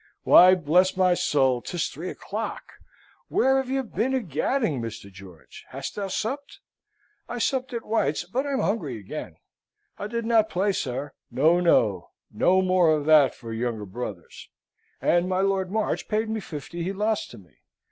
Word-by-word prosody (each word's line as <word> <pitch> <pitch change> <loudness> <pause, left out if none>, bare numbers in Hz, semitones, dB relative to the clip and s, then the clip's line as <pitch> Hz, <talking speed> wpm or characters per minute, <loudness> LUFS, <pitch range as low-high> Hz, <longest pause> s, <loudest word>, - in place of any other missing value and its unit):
Why, 185 +1 +8
bless 180 +3 +2
my 185 -1 +4
soul, 130 -7 +1
'tis 175 +4 -2
three 170 +6 -6
o'clock! 215 +3 -5 0.6
Where 265 +1 +2
have 265 -1 -2
you 270 0 0
been 240 +3 -1
a - - +2
gadding, 170 - -1
Mr. 115 -3 -7
George? 95 -4 -14
Hast - - -6
thou 200 -1 -4
supped? 265 +9 -4 0.7
I 245 - -4
supped 255 +1 -1
at 235 -2 -5
White's, 160 -10 0
but 250 +11 -3
I'm 275 -2 0
hungry 160 - -1
again. 100 -3 -7 0.6
I 205 - -4
did 230 +1 -3
not 225 -2 +3
play, 195 +3 +1
sir, 140 -4 -4 0.2
no, 160 +6 +3
no; 110 - +2 0.2
no 185 +1 +3
more 185 -2 +3
of 150 -1 -3
that 150 -3 +5
for 115 -2 -8
younger 115 -2 -3
brothers! 100 -4 -8 0.5
And 175 +1 +2
my 185 0 +1
Lord 195 -1 0
March 215 +2 -2
paid 220 +1 -1
me 220 - -2
fifty 170 -2 -7
he 185 +3 -2
lost 210 +2 -1
to 120 - -12
me. 90 - -19
185 Hz, 170 wpm, -25 LUFS, 135-220 Hz, 0.7 s, Why